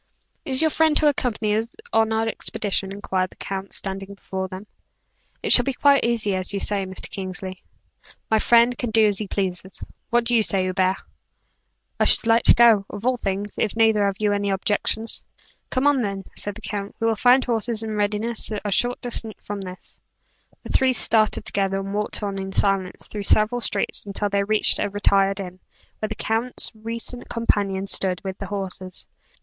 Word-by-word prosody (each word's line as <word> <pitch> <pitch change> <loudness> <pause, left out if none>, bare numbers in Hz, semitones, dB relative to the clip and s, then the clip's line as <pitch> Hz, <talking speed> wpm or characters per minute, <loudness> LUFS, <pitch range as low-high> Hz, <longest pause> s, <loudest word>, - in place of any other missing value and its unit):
"Is 260 0 -2
your 315 -1 +2
friend 315 -1 +3
to 305 - +3
accompany 225 -7 0
us 225 +1 -1 0.3
on 225 0 +3
our 220 0 0
expedition?" 200 -3 -1
inquired 190 -2 -2
the - - -18
count, 195 -1 -6
standing 195 0 -5
before 190 -1 -5
them. 185 +2 -9 0.8
"It - - +4
shall 245 - +8
be 275 - -1
quite 280 +1 +4
as 235 -2 +1
you 190 -2 0 0.2
say, 195 -1 0
Mr. 190 - -5
Kingsley." 185 -1 -6 0.7
"My 220 - +4
friend 235 +2 +4
can 240 - -3
do 220 0 +4
as 205 -2 +2
he 210 - -4
pleases. 190 -1 -4 0.3
What 240 0 +2
do 240 +1 +1
you 225 - +5
say, 195 -3 +1
Hubert?" 185 0 0 1.0
"I - - +3
should - - +5
like 230 +1 +4
to - - +8
go, 230 -4 +6
of 205 +2 -8
all 255 0 +2
things, 200 -2 -3
if 215 - 0
neither 220 -2 +3
of 195 - -1
you 210 -1 +1
have 205 - +1
any 200 0 -1
objections." 210 +3 -1 0.5
"Come 255 +1 -1
on, 290 -3 +3
then," 195 -3 -3
said 205 -1 -3
the 225 - -11
count, 205 -2 -5
"we 225 - -1
will 225 -1 +2
find 250 +4 +4
horses 230 -1 -1
in 220 -1 -4
readiness 210 +3 -1
a 205 - -1
short 245 +5 +1
distance 225 -3 +1
from 205 -1 -5
this." 185 -1 -9 0.6
The - - -10
three 260 -1 +3
started 220 -2 +2
together, 195 -1 0
and 195 0 -5
walked 210 +1 -2
on 200 -1 -3
in 190 0 -6
silence 195 -2 0
through 210 - -6
several 215 +4 +3
streets, 205 -3 -1
until 205 0 -2
they 200 0 +1
reached 215 +1 +3
a - - 0
retired 195 -1 +2
inn, 185 -1 -7 0.4
where 215 - -3
the 220 - -4
count's 225 +4 -1
recent 230 +2 -4
companion 200 -4 0
stood, 190 -2 +3
with 190 -1 -6
the - - -5
horses. 190 -2 -5
210 Hz, 195 wpm, -23 LUFS, 195-230 Hz, 1.0 s, shall